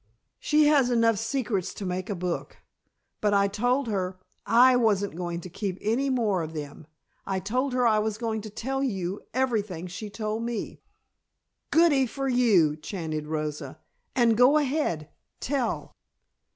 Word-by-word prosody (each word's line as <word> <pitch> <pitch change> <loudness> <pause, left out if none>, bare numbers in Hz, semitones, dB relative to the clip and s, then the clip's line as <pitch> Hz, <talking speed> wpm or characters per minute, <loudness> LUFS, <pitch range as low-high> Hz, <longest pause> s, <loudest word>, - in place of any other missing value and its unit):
"She 300 0 +3
has 285 -4 +4
enough 230 -3 +3
secrets 225 -6 -2
to 200 - -6
make 185 +2 -3
a 205 - -1
book. 180 -1 -4 0.6
But 205 -1 +2
I 200 0 +4
told 245 +7 0
her 190 -3 -2 0.3
I 245 +4 +6
wasn't 205 -7 +1
going 175 -1 -4
to 185 - -8
keep 185 +1 -4
any 240 +6 0
more 220 -8 +1
of 160 0 -6
them. 145 0 -7 0.4
I 190 -1 -2
told 250 +7 -1
her 250 -1 +2
I 215 -2 +4
was 215 0 -1
going 225 -2 -2
to 215 - -8
tell 265 +6 -3
you 195 -6 -2
everything 215 -9 -1
she 180 +4 -7
told 215 +1 -3
me." 235 -1 -4 0.9
"Goody 300 -6 +4
for 270 +3 -4
you!" 215 - +4
chanted 155 -2 -5
Rosa. 150 -1 -4 0.4
"And 235 -3 +4
go 250 +6 +6
ahead 270 - -1 0.3
tell." 260 -4 -2
215 Hz, 155 wpm, -27 LUFS, 185-250 Hz, 0.9 s, I